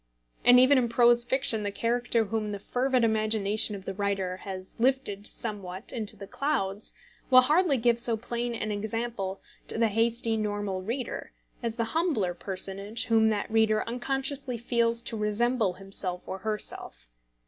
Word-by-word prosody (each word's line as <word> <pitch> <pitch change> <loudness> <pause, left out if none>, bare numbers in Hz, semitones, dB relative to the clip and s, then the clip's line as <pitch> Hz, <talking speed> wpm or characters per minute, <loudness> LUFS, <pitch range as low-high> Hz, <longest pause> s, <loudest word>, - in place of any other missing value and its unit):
And 245 +1 +8
even 260 +2 +6
in 240 -2 0
prose 240 0 +5
fiction 250 -3 0
the 205 - -1
character 235 +2 0
whom 215 0 -2
the - - -3
fervid 250 +4 0
imagination 215 -1 +3
of 195 -1 -10
the 195 - -4
writer 195 -2 -2
has 190 -1 -7
lifted 230 -5 0
somewhat 200 -3 -5
into 220 -3 -1
the 200 - -8
clouds, 200 -6 -1 0.4
will 255 -1 +8
hardly 300 +2 +3
give 235 0 +2
so 235 -1 +2
plain 235 +1 -3
an 215 -1 -3
example 210 -2 -3 0.3
to - - -4
the 230 -1 +3
hasty 225 +1 +1
normal 205 -3 -2
reader 235 +6 -5 0.3
as 230 -2 -2
the 230 - 0
humbler 300 - +1
personage 195 +4 -3
whom 225 -1 +4
that 210 0 -2
reader 220 -1 +3
unconsciously 270 +1 -2
feels 235 0 0
to - - -2
resemble 215 0 +1
himself 185 -1 -4
or 190 - -5
herself. 210 - -5
225 Hz, 160 wpm, -28 LUFS, 200-240 Hz, 0.4 s, And